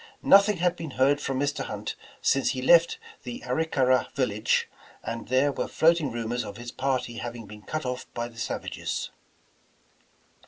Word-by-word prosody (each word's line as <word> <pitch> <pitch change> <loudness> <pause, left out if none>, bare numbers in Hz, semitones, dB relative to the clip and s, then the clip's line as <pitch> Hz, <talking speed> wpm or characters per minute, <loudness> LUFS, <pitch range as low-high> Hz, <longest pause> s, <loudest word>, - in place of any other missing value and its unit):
Nothing 200 0 +6
had 175 +1 +1
been 165 -2 -6
heard 140 +2 +3
from 135 -2 -2
Mr. 145 +1 -1
Hunt - - -4 0.3
since - - +2
he - - -4
left - - +5 0.2
the 245 +2 -7
Arickara 130 -6 +2
village, 110 -5 +1 0.4
and 115 0 -5
there 130 +3 +3
were - - -3
floating 165 -4 +3
rumors 120 +1 -2
of 105 +1 -8
his 120 0 -7
party 130 -3 -2
having 120 -1 -6
been 105 +1 -11
cut 155 +6 -4
off 125 0 -4
by 120 0 -2
the 115 -1 -13
savages. - - -3
130 Hz, 160 wpm, -27 LUFS, 120-160 Hz, 0.4 s, Nothing